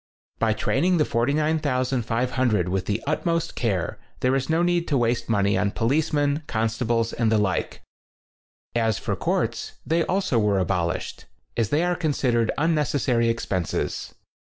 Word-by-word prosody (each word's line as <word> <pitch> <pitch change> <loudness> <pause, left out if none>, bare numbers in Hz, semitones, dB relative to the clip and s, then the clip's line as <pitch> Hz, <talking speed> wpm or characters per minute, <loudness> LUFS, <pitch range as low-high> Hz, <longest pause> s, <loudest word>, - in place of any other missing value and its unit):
By 110 -1 +2
training 175 +10 +1
the 150 - +3
49,500 125 - 0
with 95 0 -2
the 105 +2 -1
utmost 165 +2 -1
care 100 -8 -1 0.2
there 130 +1 +2
is 135 +1 -1
no 165 +2 +2
need 175 -1 +1
to 145 - +1
waste 120 -1 0
money 100 -2 +2
on 100 - +1
policemen, 145 +5 +1
consta 115 +1 -1
bles 115 -1 +1
and 115 -2 +1
the 110 - +4
like. 100 -3 -1 0.9
As 115 -3 +1
for - - -2
courts, - - -1
they 165 +1 +2
also 185 -10 +1
were 105 -2 +2
abolished, 90 -2 -2 0.3
as 115 -3 0
they 150 +6 +2
are 180 0 +1
con 160 -4 0
sidered 120 -4 +1
unnecessary 145 -6 +1
expenses. 95 -6 -2
120 Hz, 150 wpm, -24 LUFS, 110-150 Hz, 0.9 s, the